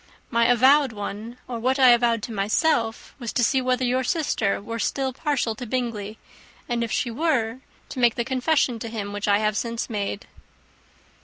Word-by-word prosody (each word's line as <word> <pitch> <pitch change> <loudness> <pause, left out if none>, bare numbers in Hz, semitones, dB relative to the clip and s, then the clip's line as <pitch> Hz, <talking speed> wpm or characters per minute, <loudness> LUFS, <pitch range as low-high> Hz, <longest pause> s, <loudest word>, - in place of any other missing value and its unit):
My 235 -1 +3
avowed 260 +2 +5
one, 215 +3 -6
or 240 -2 -4
what 260 +4 +1
I 260 -2 +7
avowed 235 -2 +3
to 235 - -5
myself, 225 +3 0
was 235 -3 -4
to 245 - +1
see 265 +3 +2
whether 255 0 0
your 255 +1 +1
sister 250 - 0
was 230 +2 -4
still 265 -1 -1
partial 275 -5 -1
to 245 +2 -8
Bingley, 220 -4 -3 0.5
and 240 -1 -1
if 230 - -4
she 240 - -1
were, 255 -4 0 0.3
to 260 - -6
make 240 -2 +4
the 235 - -2
confession 260 -2 +1
to 230 - -5
him 205 -3 -5
which 205 +1 -3
I 200 0 +4
have 215 0 0
since 230 +1 -3
made." 205 -1 -3
235 Hz, 185 wpm, -24 LUFS, 220-255 Hz, 0.5 s, I